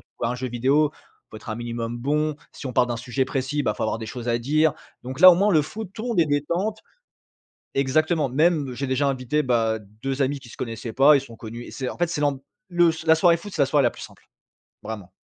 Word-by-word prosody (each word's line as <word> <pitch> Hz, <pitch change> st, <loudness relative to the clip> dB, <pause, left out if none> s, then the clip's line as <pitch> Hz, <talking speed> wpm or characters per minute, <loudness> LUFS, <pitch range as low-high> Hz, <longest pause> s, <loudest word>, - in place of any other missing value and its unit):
tu -, -, -27 dB
joues -, -, -1 dB
à -, -, 0 dB
un -, -, -2 dB
jeu 130 Hz, +1 st, -4 dB
vidéo, 135 Hz, +5 st, +2 dB
il -, -, -28 dB
faut -, -, -9 dB
être 110 Hz, -, -12 dB
un 110 Hz, -, -2 dB
minimum 120 Hz, 0 st, -4 dB
bon, 150 Hz, +4 st, 0 dB, 0.2 s
si 140 Hz, -, -8 dB
on 125 Hz, -, -4 dB
parle 125 Hz, -, +3 dB
d'un 120 Hz, -, -2 dB
sujet 125 Hz, +2 st, -1 dB
précis, 135 Hz, +2 st, -2 dB
bah, -, -, +1 dB
il -, -, -14 dB
faut -, -, 0 dB
avoir 110 Hz, -, -1 dB
des 115 Hz, -, -6 dB
choses 120 Hz, 0 st, -6 dB
à 115 Hz, -, +2 dB
dire. 155 Hz, +5 st, +2 dB, 0.3 s
Donc, 130 Hz, +4 st, -6 dB
là, 185 Hz, 0 st, +11 dB
au 170 Hz, -, +4 dB
moins, 200 Hz, +2 st, +3 dB
le 155 Hz, -2 st, +4 dB
foot, 210 Hz, +6 st, -7 dB
tout 220 Hz, -, -6 dB
le 245 Hz, -, -3 dB
monde 210 Hz, -7 st, +2 dB
est 160 Hz, -, +3 dB
détente 170 Hz, +9 st, -1 dB, 1.0 s
exactement, 150 Hz, +2 st, +1 dB
même, 150 Hz, -1 st, +2 dB
j'ai 140 Hz, +3 st, -3 dB
déjà 130 Hz, +2 st, +1 dB
invité, 135 Hz, +2 st, 0 dB
bah, 115 Hz, -3 st, +1 dB, 0.2 s
2 135 Hz, 0 st, -2 dB
amis 140 Hz, +2 st, -1 dB
qui 130 Hz, -, -14 dB
se -, -, -13 dB
connaissaient 115 Hz, -1 st, -5 dB
pas, 140 Hz, +4 st, +6 dB
ils 140 Hz, -, +4 dB
se -, -, -11 dB
sont 115 Hz, -, -12 dB
connus 115 Hz, +2 st, -8 dB
et -, -, -11 dB
c'est 130 Hz, -, -4 dB
en -, -, -8 dB
fait, 175 Hz, -, +2 dB
c'est 165 Hz, -3 st, -3 dB
l'amb 145 Hz, -2 st, +1 dB, 0.3 s
le 175 Hz, -1 st, +4 dB
la 160 Hz, -, +6 dB
soirée 170 Hz, +1 st, +4 dB
foot, 195 Hz, +4 st, -9 dB
c'est 155 Hz, -, 0 dB
la -, -, +2 dB
soirée 140 Hz, +1 st, +2 dB
la 120 Hz, -, +4 dB
plus -, -, -13 dB
simple, -, -, -12 dB, 0.6 s
vraiment. 105 Hz, -4 st, -7 dB
135 Hz, 275 wpm, -24 LUFS, 120-155 Hz, 1.0 s, là